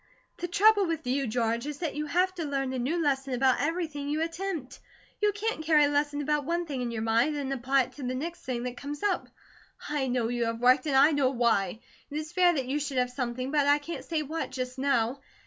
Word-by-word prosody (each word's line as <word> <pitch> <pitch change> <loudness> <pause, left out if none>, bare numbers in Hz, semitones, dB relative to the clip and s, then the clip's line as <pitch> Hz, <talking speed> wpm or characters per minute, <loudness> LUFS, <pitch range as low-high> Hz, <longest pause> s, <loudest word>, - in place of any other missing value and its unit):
"The 350 - -3
trouble 410 +2 +4
with 325 -2 -3
you, 265 +1 0
George, 230 +2 -1
is 295 -1 -4
that 325 -3 -3
you 300 +1 -3
have 365 +4 +2
to 350 -3 -4
learn 275 -3 -2
a 260 - -2
new 290 +8 0
lesson 270 -4 0
about 260 0 +3
every 335 +4 0
thing 290 -2 -6
you 305 +2 0
attempt. 330 -4 -4 0.4
You 420 0 +4
can't 415 -5 -3
carry 305 -1 +5
a 285 - +3
lesson 290 0 0
about 295 0 +1
one 340 +4 -1
thing 280 -5 -4
in 245 - -2
your 225 -2 -3
mind, 230 +7 +2
and 275 -2 -2
apply 265 +1 +2
it 250 - -10
to - - -8
the 255 0 -2
next 335 +6 -4
thing 245 -6 -3
that 250 0 -5
comes 285 +2 -6
up. 410 - 0 0.6
I 290 -3 0
know 245 -2 0
you 240 -1 0
have 230 0 -2
worked, 255 +4 +4
and 280 - +1
I 280 +4 +7
know 285 -3 +2
why. 230 -5 +1 0.3
It 290 - -4
is 310 0 -5
fair 360 -1 +4
that 275 -6 -1
you 275 +4 -1
should 280 -2 -3
have 250 0 +1
something, 250 0 -3
but 295 -2 +2
I 290 0 +6
can't 310 +3 -6
say 320 -2 -2
what, 315 +3 -4
just 255 0 -5
now. 260 -2 +1
280 Hz, 250 wpm, -28 LUFS, 255-315 Hz, 0.6 s, I